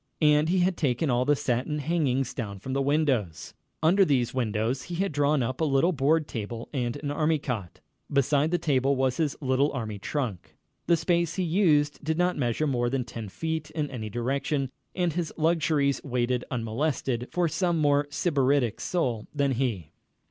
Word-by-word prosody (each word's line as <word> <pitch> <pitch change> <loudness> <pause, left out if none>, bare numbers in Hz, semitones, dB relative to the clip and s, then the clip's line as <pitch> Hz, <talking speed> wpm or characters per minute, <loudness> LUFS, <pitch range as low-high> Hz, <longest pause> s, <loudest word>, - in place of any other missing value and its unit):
And 150 +1 +4
he 185 +1 +3
had 180 0 +1
taken 140 0 +1
all 125 +1 +2
the 145 +1 +4
satin 130 +3 -1
hangings 145 -4 0
down 100 -5 -5
from 130 +7 -6
the 135 - +1
windows. 135 - 0 0.3
Under 185 +5 +5
these 130 -8 +1
windows 115 +1 -1
he 175 +6 -6
had 195 +2 0
drawn 145 -1 +2
up 130 +5 -3
a - - +3
little 150 +4 +3
board 155 +1 +2
table 115 +1 -6
and 120 -4 -1
an 145 - -2
army 155 +2 +1
cot. 115 - -5 0.3
Beside 140 +2 +2
the 175 - +1
table 140 -3 +1
was 130 -1 0
his 155 -4 0
little 135 +1 +2
army 110 -5 -4
trunk. 120 - -4 0.3
The 170 - +4
space 170 0 0
he 185 - 0
used 155 -5 +2
did 160 +1 -1
not 180 0 +2
measure 125 +2 0
more 120 -4 0
than 130 0 -1
ten 115 -3 -7
feet 160 +6 -3
in 150 -2 -3
any 110 -4 -5
direction, 135 +4 -1 0.2
and 175 -3 0
his 170 -1 -2
luxuries 155 -3 +2
waited 125 -2 -1
unmolested 125 +1 -2
for 175 -1 +1
some 170 +2 0
more 145 -1 +2
sybaritic 140 - +1
soul 125 -11 -1
than 140 -1 +2
he. 115 - -2
140 Hz, 180 wpm, -27 LUFS, 125-160 Hz, 0.3 s, Under